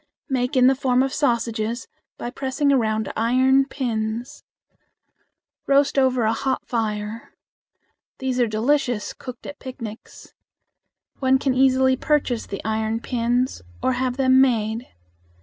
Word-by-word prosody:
Make 250 Hz, 0 st, 0 dB
in 250 Hz, -, +6 dB
the 265 Hz, -, +6 dB
form 260 Hz, -1 st, +2 dB
of 270 Hz, -, -2 dB
sausages 235 Hz, -4 st, -1 dB, 0.3 s
by 240 Hz, -, -5 dB
pressing 280 Hz, +2 st, 0 dB
around 220 Hz, -4 st, 0 dB
iron 260 Hz, +4 st, +3 dB
pins. 235 Hz, 0 st, -3 dB, 1.2 s
Roast 280 Hz, 0 st, +3 dB
over 255 Hz, -2 st, +2 dB
a 220 Hz, +1 st, +2 dB
hot 260 Hz, +3 st, -2 dB
fire. 215 Hz, -2 st, -3 dB, 0.8 s
These 260 Hz, -2 st, -2 dB
are 240 Hz, -, +3 dB
delicious 240 Hz, 0 st, 0 dB
cooked 255 Hz, -2 st, -10 dB
at 290 Hz, -, -8 dB
picnics. 235 Hz, -5 st, -9 dB, 0.9 s
One 265 Hz, 0 st, +3 dB
can 265 Hz, -1 st, 0 dB
easily 260 Hz, 0 st, +4 dB
purchase 270 Hz, -5 st, 0 dB
the 200 Hz, -, -6 dB
iron 220 Hz, +1 st, -1 dB
pins 245 Hz, -, -1 dB, 0.2 s
or 260 Hz, -, +2 dB
have 255 Hz, 0 st, -1 dB
them 260 Hz, -1 st, +5 dB
made. 230 Hz, -2 st, +1 dB
250 Hz, 130 wpm, -23 LUFS, 225-265 Hz, 1.2 s, in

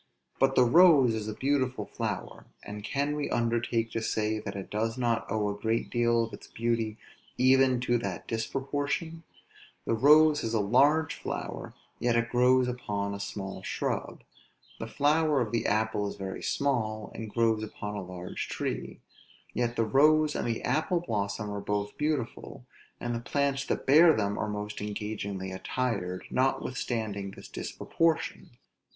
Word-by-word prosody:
but 135 Hz, 0 st, +3 dB
the 125 Hz, -, +6 dB
rose 145 Hz, -4 st, +6 dB
is 110 Hz, -1 st, -3 dB
a 110 Hz, -, -3 dB
beautiful 130 Hz, -2 st, 0 dB
flower; -, -, -5 dB, 0.2 s
and 105 Hz, 0 st, -7 dB
can 140 Hz, +5 st, -1 dB
we 150 Hz, -1 st, -2 dB
undertake 115 Hz, -1 st, 0 dB
to 115 Hz, -, -2 dB
say 110 Hz, -1 st, 0 dB
that 100 Hz, -2 st, -6 dB
it 95 Hz, -1 st, -7 dB
does 115 Hz, +2 st, -1 dB
not 115 Hz, -2 st, 0 dB
owe 105 Hz, -1 st, +1 dB
a -, -, -1 dB
great 115 Hz, +1 st, 0 dB
deal 120 Hz, -1 st, +2 dB
of 115 Hz, -, -6 dB
its -, -, -10 dB
beauty 115 Hz, -2 st, -1 dB, 0.4 s
even 130 Hz, 0 st, +4 dB
to 120 Hz, -1 st, +1 dB
that 95 Hz, -6 st, -5 dB
disproportion; 145 Hz, +7 st, -2 dB, 0.6 s
the -, -, +1 dB
rose 150 Hz, +5 st, +6 dB
is 115 Hz, 0 st, -1 dB
a -, -, +3 dB
large 145 Hz, +9 st, +3 dB
flower, -, -, -5 dB, 0.2 s
yet 120 Hz, 0 st, +1 dB
it 115 Hz, 0 st, +1 dB
grows 125 Hz, +1 st, +4 dB
upon 105 Hz, -5 st, -3 dB
a 100 Hz, -, -5 dB
small 100 Hz, -1 st, -5 dB
shrub; -, -, -3 dB, 0.6 s
the 110 Hz, -, -4 dB
flower 150 Hz, +3 st, +2 dB
of 120 Hz, -4 st, -1 dB
the 115 Hz, -, 0 dB
apple 110 Hz, -1 st, +1 dB
is -, -, -5 dB
very 95 Hz, -1 st, -6 dB
small, 110 Hz, -6 st, -1 dB
and 110 Hz, -1 st, -6 dB
grows 115 Hz, -1 st, +2 dB
upon 105 Hz, -1 st, -6 dB
a 105 Hz, -, -4 dB
large 90 Hz, -1 st, -6 dB
tree; -, -, -4 dB, 0.5 s
yet 120 Hz, -1 st, -1 dB
the 115 Hz, -, +1 dB
rose 150 Hz, +6 st, +4 dB
and -, -, -1 dB
the 115 Hz, -1 st, -2 dB
apple 155 Hz, +7 st, +1 dB
blossom 105 Hz, -7 st, -3 dB
are 100 Hz, 0 st, -4 dB
both 105 Hz, 0 st, -2 dB
beautiful, 150 Hz, -5 st, -3 dB, 0.3 s
and 120 Hz, 0 st, -3 dB
the 115 Hz, -, -2 dB
plants 140 Hz, +3 st, 0 dB
that -, -, -2 dB
bear 160 Hz, +4 st, +7 dB
them 100 Hz, -1 st, 0 dB
are 105 Hz, -, -2 dB
most 105 Hz, 0 st, -5 dB
engagingly 100 Hz, -2 st, -4 dB
attired, 95 Hz, -2 st, -2 dB
notwithstanding 115 Hz, -6 st, -1 dB
this -, -, -11 dB
disproportion. 165 Hz, -1 st, -1 dB
115 Hz, 160 wpm, -29 LUFS, 105-135 Hz, 0.6 s, bear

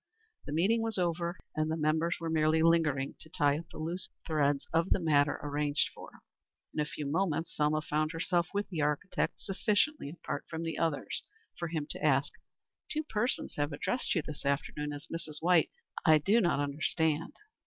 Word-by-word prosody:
The -, -, -4 dB
meeting 195 Hz, +9 st, +3 dB
was 225 Hz, -2 st, 0 dB
over 170 Hz, 0 st, 0 dB, 0.2 s
and 155 Hz, 0 st, +1 dB
the 160 Hz, -, 0 dB
members 160 Hz, +2 st, +1 dB
were 165 Hz, -1 st, -3 dB
merely 160 Hz, 0 st, +3 dB
lingering 155 Hz, -5 st, +3 dB
to 160 Hz, -, -11 dB
tie 145 Hz, -1 st, +2 dB
up 165 Hz, -, -11 dB
the -, -, -11 dB
loose 170 Hz, +4 st, -3 dB, 0.2 s
threads 145 Hz, -3 st, +1 dB
of 165 Hz, +3 st, +2 dB
the -, -, +3 dB
matter 145 Hz, -3 st, +3 dB
arranged 145 Hz, 0 st, +1 dB
for. -, -, -10 dB, 0.6 s
In -, -, -3 dB
a 150 Hz, -, +2 dB
few 150 Hz, 0 st, -5 dB
moments 165 Hz, +1 st, 0 dB
Selma 150 Hz, +1 st, +2 dB
found 155 Hz, +1 st, 0 dB
herself 175 Hz, +1 st, +1 dB
with 205 Hz, 0 st, -1 dB
the 170 Hz, -5 st, -2 dB
architect 150 Hz, +5 st, 0 dB
sufficiently 210 Hz, -, +1 dB
apart 170 Hz, -, -5 dB
from 165 Hz, 0 st, -4 dB
the 165 Hz, -1 st, -3 dB
others 160 Hz, -3 st, -1 dB, 0.3 s
for 170 Hz, -, -3 dB
him 160 Hz, -2 st, -2 dB
to -, -, -6 dB
ask: 140 Hz, -2 st, +3 dB, 0.6 s
"Two 310 Hz, 0 st, 0 dB
persons 240 Hz, -3 st, -1 dB
have 145 Hz, +1 st, 0 dB
addressed 220 Hz, -, -1 dB
you 165 Hz, -, +1 dB
this 150 Hz, 0 st, -7 dB
afternoon 145 Hz, +1 st, -1 dB
as 145 Hz, +1 st, -6 dB
Mrs. 160 Hz, -3 st, -5 dB
White. 175 Hz, -1 st, +4 dB, 0.3 s
I 155 Hz, -1 st, +7 dB
do 200 Hz, +10 st, +3 dB
not 170 Hz, -6 st, +2 dB
understand." 155 Hz, +2 st, 0 dB
160 Hz, 185 wpm, -31 LUFS, 150-170 Hz, 0.6 s, I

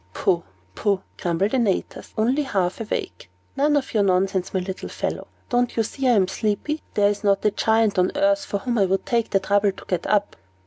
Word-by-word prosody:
"Poh, 170 Hz, -, +1 dB, 0.3 s
poh!" 200 Hz, -, 0 dB
grumbled 180 Hz, +5 st, 0 dB
Antaeus, 230 Hz, -8 st, -1 dB
only 245 Hz, +7 st, +2 dB
half 195 Hz, -9 st, -1 dB
awake. 220 Hz, -, -4 dB, 0.3 s
"None 290 Hz, +1 st, +3 dB
of 270 Hz, -, -3 dB
your 215 Hz, -, +3 dB
nonsense, 190 Hz, -1 st, +1 dB
my 190 Hz, -, 0 dB
little 185 Hz, +1 st, -5 dB
fellow! -, -, -4 dB, 0.2 s
Don't 245 Hz, -1 st, 0 dB
you 225 Hz, -, +3 dB
see 265 Hz, +4 st, -2 dB
I'm 210 Hz, -7 st, +4 dB
sleepy? 215 Hz, +11 st, -2 dB
There 205 Hz, -1 st, +4 dB
is 205 Hz, -, -6 dB
not 200 Hz, 0 st, +2 dB
a 210 Hz, -, +4 dB
Giant 220 Hz, -2 st, +2 dB
on 180 Hz, -, +3 dB
earth 295 Hz, 0 st, +2 dB
for 205 Hz, -, -2 dB
whom 240 Hz, +2 st, -1 dB
I 195 Hz, -, +4 dB
would 190 Hz, +1 st, 0 dB
take 235 Hz, -2 st, 0 dB
the 195 Hz, -, +2 dB
trouble 200 Hz, +1 st, +2 dB
to -, -, -13 dB
get 180 Hz, -, -2 dB
up." 205 Hz, -1 st, +1 dB
205 Hz, 205 wpm, -23 LUFS, 195-245 Hz, 0.3 s, I'm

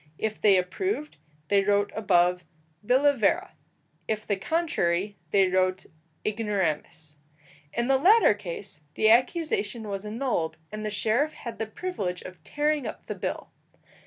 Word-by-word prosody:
If 215 Hz, -1 st, -3 dB
they 200 Hz, -2 st, +6 dB
approved, 300 Hz, -, -2 dB, 0.3 s
they 200 Hz, -1 st, +4 dB
wrote 205 Hz, 0 st, +2 dB
above, 180 Hz, -4 st, +2 dB, 0.4 s
billa 275 Hz, +6 st, +4 dB
vera; 335 Hz, -, +1 dB, 0.5 s
if 215 Hz, -1 st, -2 dB
the 205 Hz, -, 0 dB
contrary, 200 Hz, -, 0 dB
they 195 Hz, -2 st, +4 dB
wrote 185 Hz, 0 st, +1 dB, 0.4 s
ignoramus. 175 Hz, -8 st, -2 dB, 0.5 s
In 235 Hz, 0 st, -1 dB
the 265 Hz, -1 st, +3 dB
latter 415 Hz, -, +6 dB
case 190 Hz, -3 st, -7 dB
the 220 Hz, 0 st, +4 dB
accusation 255 Hz, -, +1 dB
was 195 Hz, -1 st, -4 dB
annulled, 210 Hz, -8 st, -2 dB
and 215 Hz, 0 st, -5 dB
the 215 Hz, -, -2 dB
sheriff 230 Hz, +8 st, 0 dB
had 230 Hz, -3 st, -8 dB
the 220 Hz, -, -2 dB
privilege 210 Hz, -, -4 dB
of 185 Hz, -4 st, -11 dB
tearing 295 Hz, -, 0 dB
up -, -, -8 dB
the -, -, -4 dB
bill. -, -, -5 dB
210 Hz, 140 wpm, -27 LUFS, 185-265 Hz, 0.5 s, they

